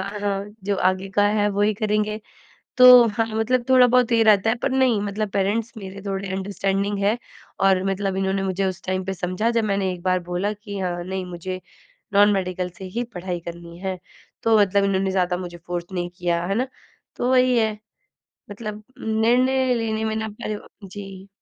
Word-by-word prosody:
अ, 200 +2 -5
हाँ, 200 -1 -1 0.2
जो 200 -1 0
आगे 185 +1 +1
का 205 0 +4
है 210 0 +2
वही 205 +1 +1
करेंगे। 215 0 -1 0.6
तो 250 -2 +9
हाँ, 225 +2 0
मतलब 240 +2 +1
थोड़ा 255 -1 +7
बहुत 250 0 +3
ये 230 -1 +4
रहता 215 0 +4
है, 225 - +2
पर 255 +2 -2
नहीं 255 -5 +3
मतलब 205 +1 -2
पेरेंट्स 205 +4 0
मेरे 195 -1 -8
थोड़े 195 0 -3
अंडरस्टैंडिंग 195 +1 -1
हैं 215 +4 +2 0.5
और 190 -1 +4
मतलब 195 0 -2
इन्होंने 195 0 0
मुझे 190 0 -1
उस 190 0 -3
टाइम 185 0 -1
पे 195 - -2
समझा 185 +5 -1
जब 230 -1 +1
मैंने 195 -2 0
एक 175 - -9
बार 185 -1 +2
बोला 195 +4 -1
कि 205 -1 -8
हाँ 175 -1 -2
नहीं, 190 0 -4
मुझे 180 +1 -6 0.5
नॉन 205 +1 +6
मेडिकल 185 -1 -2
से 190 - -8
ही 240 - 0
पढ़ाई 180 0 -3
करनी 170 0 -10
है। 190 -1 -3 0.5
तो 225 -1 +4
मतलब 200 0 +3
इन्होंने 195 -1 +1
ज़्यादा 180 -1 +1
मुझे 175 -1 -7
फ़ोर्स 175 0 -5
नहीं 175 -1 -3
किया, 175 -2 0
है 195 +2 -1
ना। 255 +3 0 0.5
तो 245 - -1
वही 255 -1 +4
है 220 -2 +1 0.7
मतलब 210 0 -6 0.2
निर्णय 250 +4 +2
लेने 220 -1 -1
में 220 0 -1
ना 220 0 -2
पहले 210 0 -5
ब - - -13 0.2
जी। 195 0 -9
200 Hz, 195 wpm, -23 LUFS, 185-220 Hz, 0.7 s, तो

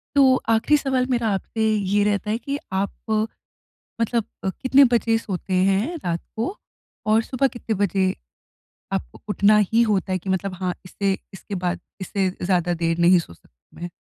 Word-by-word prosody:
तो 270 -2 +6
आखिरी 225 +7 +4
सवाल 265 -3 0
मेरा 235 -3 +1
आपसे 220 +3 -3
ये 205 -1 +1
रहता 210 0 0
है 225 - 0
कि 280 +3 -4
आप 190 +1 0 1.1
मतलब 230 -1 +1 0.2
अ, - - +1
कितने 265 +7 +4
बजे 230 -1 +3
सोते 190 -3 -4
हैं 215 - +1
रात 170 -1 -1 0.2
को, 245 - -2 0.5
और 220 +1 +4
सुबह 255 +3 0
कितने 235 -3 -4
बजे 190 0 +1 0.8
आपको - - -4
उठना 205 +1 +4
ही 230 +1 +4
होता 205 -4 +1
है 185 - +1
कि 190 - -7
मतलब 190 +1 -1
हाँ, 180 0 -2
इससे 195 +1 -1 0.2
इसके 195 +1 -7
बाद 175 0 0 0.2
इससे 190 0 0
ज़्यादा 180 -1 +1
देर 165 -1 0
नहीं 175 +1 +5
सो 165 - -8
सक - - -24 0.2
मैं? 175 +1 -6
200 Hz, 170 wpm, -23 LUFS, 185-230 Hz, 1.1 s, तो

